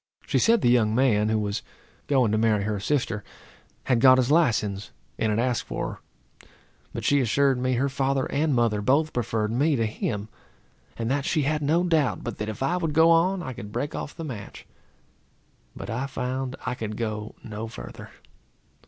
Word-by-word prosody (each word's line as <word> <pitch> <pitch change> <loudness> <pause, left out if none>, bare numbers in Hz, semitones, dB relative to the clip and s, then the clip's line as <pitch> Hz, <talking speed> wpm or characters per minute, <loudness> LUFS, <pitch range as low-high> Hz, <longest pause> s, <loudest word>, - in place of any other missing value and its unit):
She - - +1
said 230 0 +4
the - - +2
young 110 -3 +3
man, 110 -5 +3
who 110 - +2
was 105 0 -2 0.5
going 130 -6 +3
to 110 - +2
marry 110 -2 +2
her 105 0 -2
sister, 115 -2 -1 0.6
had 125 -3 +1
got 130 0 +8
his 130 +1 +2
license, 105 - +2 0.3
and 110 - +1
had 105 - +1
asked 120 0 0
for - - -4 0.4
her; - - -23 0.4
but - - -5
she 145 -1 +4
assured 135 +2 +2
me 130 +1 0
her 130 +3 +1
father 135 0 0
and 145 -1 +1
mother 115 -3 +2
both 145 +7 +2
preferred 110 -2 -1
me 145 +6 +2
to 115 -3 +1
him; 110 -1 -3 0.7
and 115 +1 -2
that 140 0 0
she 155 -3 +1
had 150 +2 0
no 160 +5 +2
doubt 160 -6 +1
but 120 -3 -5
that, 105 0 -3
if 110 +4 -4
I 175 +7 +1
would 165 -4 -2
go 160 +2 +6
on, 175 +3 +3
I 130 - -5
could 105 -2 -9
break 130 +7 -3
off - - -5
the 165 - -6
match. 115 -10 -8 1.1
But - - -6
I 125 +4 -2
found 130 0 -3
I 125 - -1
could 110 -3 -5
go 110 -2 -4
no 110 0 -6
further. 115 - -9
125 Hz, 195 wpm, -25 LUFS, 110-140 Hz, 1.1 s, got